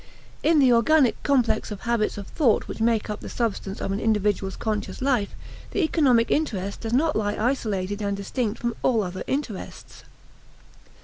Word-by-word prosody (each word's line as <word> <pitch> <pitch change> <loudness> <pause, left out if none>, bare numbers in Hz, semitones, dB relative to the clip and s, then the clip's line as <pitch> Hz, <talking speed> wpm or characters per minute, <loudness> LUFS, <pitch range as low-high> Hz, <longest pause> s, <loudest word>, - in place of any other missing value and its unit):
In 325 0 +3
the 260 -4 +5
organic 255 +3 +3
complex 265 -5 +1
of 210 -2 -7
habits 235 -3 0
of 200 - -6
thought 240 -1 +1
which - - -7
make 225 -1 +2
up 210 0 -4
the - - -8
substance 210 -4 -2
of - - -2
an 195 - -1
individual's 210 -3 0
conscious 215 -2 -3
life 255 -7 0 0.4
the 395 - +1
economic 265 -8 +3
interest 200 -10 -1
does 225 - -4
not 300 +5 +2
lie 205 -1 0
isolated 210 -5 -1
and 200 -1 -1
distinct 210 +2 -2
from 235 -1 -2
all 230 -4 +2
other 185 0 -5
interests. 265 -8 -5
225 Hz, 170 wpm, -25 LUFS, 205-255 Hz, 0.4 s, the